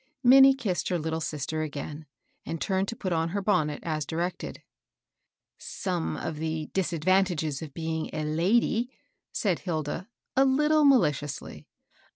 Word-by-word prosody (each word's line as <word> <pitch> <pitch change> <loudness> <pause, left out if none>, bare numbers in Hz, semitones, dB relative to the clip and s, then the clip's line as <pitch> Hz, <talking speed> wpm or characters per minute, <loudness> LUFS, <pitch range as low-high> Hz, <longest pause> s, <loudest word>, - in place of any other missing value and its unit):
Minnie 270 +2 +8
kissed 200 -9 -2
her 180 - +1
little 160 0 -2
sister 155 0 -3
again, 150 0 -6 0.4
and 165 - -4
turned 190 +2 0
to 230 - -4
put 185 -5 -2
on 165 0 0
her 200 +4 -2
bonnet, 155 -8 +1
as 155 -2 -1
directed. 170 +4 -4 0.5
" - - -58 0.2
Some 180 -4 -1
of 155 - -4
the 160 0 -3
disadvantages 175 -4 +1
of 155 -4 -8
being 160 -1 -2
a 155 - -4
lady^^ 200 +9 +2 0.4
said 190 -6 0
Hilda, 165 +1 -3 0.3
a 265 - +5
Uttle 300 +3 +3
maKdously. 150 - 0
165 Hz, 145 wpm, -27 LUFS, 155-195 Hz, 0.5 s, Minnie